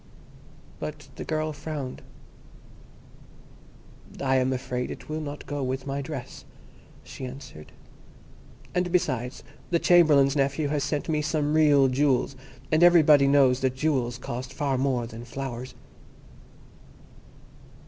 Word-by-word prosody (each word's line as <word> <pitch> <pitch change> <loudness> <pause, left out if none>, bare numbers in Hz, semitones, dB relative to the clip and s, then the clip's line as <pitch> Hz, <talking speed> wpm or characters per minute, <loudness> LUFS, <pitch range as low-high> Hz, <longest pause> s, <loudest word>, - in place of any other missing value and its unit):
But 150 -2 -7
the - - -6
girl 155 -1 -2
frowned. 145 -3 -6 2.2
"I 135 -1 +2
am 130 0 +1
afraid 125 -1 -3
it - - -9
will 155 +1 -3
not 145 -1 -7
go 145 0 -4
with 130 +1 -3
my 140 0 -3
dress," 135 -3 -7 0.6
she - - -10
answered; 130 - -9 1.0
"and, 180 0 0
besides, 130 -8 -1 0.3
the 170 - +3
Chamberlain's 150 -6 +5
nephew 140 +1 0
has 145 -1 0
sent 145 0 -2
me 155 -2 0
some 150 -1 0
real 145 -3 +5
jewels, 130 0 +1 0.4
and 155 +1 +3
everybody 155 -5 +6
knows 135 -2 +4
that 130 -1 0
jewels 130 -4 0
cost 125 +1 -6
far 140 -1 -1
more 130 -2 0
than 115 0 -9
flowers." 125 0 -6
140 Hz, 125 wpm, -26 LUFS, 130-150 Hz, 2.2 s, everybody